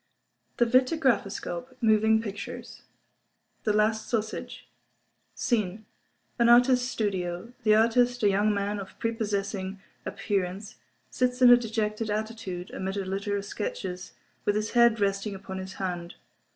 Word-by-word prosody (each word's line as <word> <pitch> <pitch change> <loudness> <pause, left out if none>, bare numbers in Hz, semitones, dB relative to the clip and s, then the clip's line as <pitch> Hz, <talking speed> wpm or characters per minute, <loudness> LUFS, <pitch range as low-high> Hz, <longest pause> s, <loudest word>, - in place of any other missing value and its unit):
The 240 - +4
Vitagraphoscope 255 - +1
(Moving 220 -1 +4
Pictures) 230 +4 -7 0.8
The 215 - +3
Last 215 +1 +1
Sausage 220 -2 -3 0.7
SCENE—An 220 +2 -2
Artist's 250 +1 +5
Studio. 190 -2 -3
The 215 -2 +4
artist, 245 +2 +3
a 205 - +6
young 205 +2 +2
man 205 0 -1
of 195 - -9
prepossessing 200 -4 -2 0.2
appearance, 195 0 -3 0.3
sits 250 0 0
in 245 - +9
a - - +11
dejected 220 -2 -2
attitude, 210 -4 -4
amid 190 +1 -4
a 195 - -2
litter 200 +2 -2
of 200 - -5
sketches, 190 -3 -5 0.3
with 205 - +1
his 215 0 -1
head 235 -2 +5
resting 195 0 0
upon 190 0 -7
his 190 +1 -7
hand. 175 -2 -4
215 Hz, 125 wpm, -27 LUFS, 195-230 Hz, 0.8 s, a